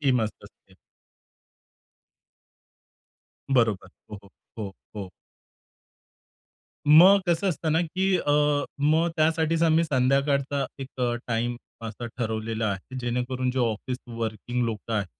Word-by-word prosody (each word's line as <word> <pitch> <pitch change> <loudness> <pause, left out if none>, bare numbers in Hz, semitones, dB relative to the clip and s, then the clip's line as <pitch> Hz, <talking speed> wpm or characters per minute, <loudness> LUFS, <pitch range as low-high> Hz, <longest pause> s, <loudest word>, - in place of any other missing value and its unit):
टीमचं 125 -6 +2 0.2
असते. - - -19 2.8
बरोबर. 110 -7 +2 0.2
हो, 105 - -6
हो, 100 - -17 0.3
हो, 100 -3 -5 0.2
हो. 95 -3 -6 1.8
मग 180 +7 +8
कसं 170 +3 +2
असतं 160 -2 -1
ना, 165 - +3
की 185 +3 0
अ, 145 - 0 0.5
मग 160 +4 +3
त्यासाठीच 160 +1 +2
आम्ही 165 0 +4
संध्याकाळचा 140 0 +1
एक 135 - -5
अ, 120 -1 +1
टाईम 120 +1 -1 0.3
असा 115 +1 -6
ठरवलेला 110 -1 -2
आहे. 100 +6 -6
जेणेकरून 125 +1 -1
जो 125 -1 +1
ऑफिस 125 +4 -4
वर्किंग 115 +1 -3
लोकं 115 0 -4
आहेत, 100 -3 0
125 Hz, 115 wpm, -26 LUFS, 115-155 Hz, 2.8 s, मग